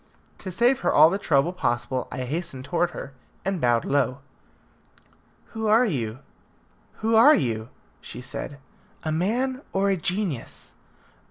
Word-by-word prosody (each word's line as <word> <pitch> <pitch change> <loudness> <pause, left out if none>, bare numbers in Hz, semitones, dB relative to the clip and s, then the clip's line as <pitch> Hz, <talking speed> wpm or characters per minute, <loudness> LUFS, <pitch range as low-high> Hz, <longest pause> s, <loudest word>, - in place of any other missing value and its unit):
To 190 - -6
save 240 +8 +2
her - - +1
all 155 +2 +7
the 195 - -1
trouble 160 -1 +2
possible, 125 -6 -1
I 130 - -4
hastened 140 -1 -4
towards 175 +2 0
her, 140 - -7 0.3
and 190 -3 -1
bowed 120 -1 +2
low. 135 -2 +1 1.3
"Who 220 -1 -3
are 225 +4 +5
you? 120 - -2 0.9
Who 225 0 +3
are 280 +8 +8
you?" 115 -3 -2 0.3
she 120 - -9
said. 130 +2 -7 0.5
"A 155 - -2
man 245 - 0
or 195 +1 +2
a 190 - +1
genius?" 180 - -3
170 Hz, 145 wpm, -25 LUFS, 130-205 Hz, 1.3 s, are